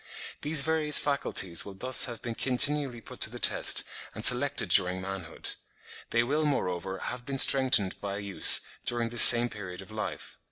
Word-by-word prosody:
These 150 -1 0
various 155 -1 +1
faculties 95 - -1
will 100 - -13
thus 130 +6 +3
have 120 -2 -11
been 120 - -7
continually 130 0 -1
put - - -15
to - - +2
the - - -11
test - - +1 0.3
and - - +2
selected - - +3
during 90 0 0
manhood; 95 -3 -7 0.6
they 115 0 -2
will, 150 +6 -4
moreover, 95 - -6
have 125 +5 -9
been 135 +2 -8
strengthened 130 -8 +2
by 100 -1 -8
use 100 -1 +4 0.2
during 120 -1 -4
this 120 0 +2
same 120 0 +9
period 90 -5 -12
of 95 - -18
life. 110 0 -10
120 Hz, 170 wpm, -25 LUFS, 95-135 Hz, 0.6 s, same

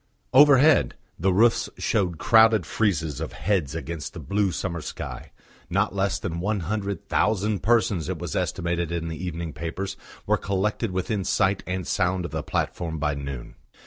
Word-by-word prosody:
Overhead 140 - +6 0.2
the 95 +3 +2
roofs 115 +5 +3
showed 90 -6 0
crowded 110 +1 +5
friezes 80 - 0
of 80 - -5
heads 85 -8 -1
against 80 -1 -5
the - - -6
blue 100 -1 0
summer 85 0 -3
sky. - - -7 0.4
Not 100 +2 +1
less 100 0 0
than 85 -3 -4
one 100 +2 -1
hundred 100 +2 -3
thousand 105 -1 +1
persons, 105 -7 +2
it 95 - -2
was 85 -3 -5
estimated 85 -1 -1
in 85 -1 -2
the 80 +2 -6
evening 85 -3 -4
papers, 85 +5 -4 0.3
were - - +2
collected 100 +3 -1
within 95 +2 -2
sight 95 0 +1
and 90 -1 -2
sound 90 +1 0
of 85 - -6
the - - -2
platform 80 -2 -2
by 75 -1 0
noon. 70 -3 -6
95 Hz, 165 wpm, -25 LUFS, 85-105 Hz, 0.4 s, Overhead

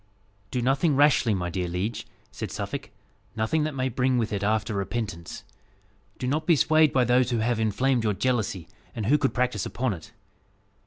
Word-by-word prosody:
"Do 125 +2 -2
nothing 140 +4 +2
rashly, 135 -6 +4
my 90 -2 -3
dear 90 0 -2
liege," 95 +6 -3 0.2
said - - -5
Suffolk; - - -5 0.5
"nothing 110 +8 0
that 155 -2 -3
may 130 0 0
bring 130 +1 +1
with 115 -3 -1
it 100 - -2
after 110 +2 0
repentance. 100 -3 -4 0.7
Do 125 - -4
not 155 +5 -1
be 170 - +6
swayed 155 +1 +4
by 130 - +3
those 125 0 +3
who 120 - 0
have 115 +1 0
inflamed 120 +3 +1
your 105 -2 +1
jealousy, 110 -8 -1 0.3
and 110 - -3
who 145 +7 +4
could 135 -2 0
practise 125 -6 0
upon 125 -3 -1
it. 80 - -10
120 Hz, 180 wpm, -26 LUFS, 105-135 Hz, 0.7 s, be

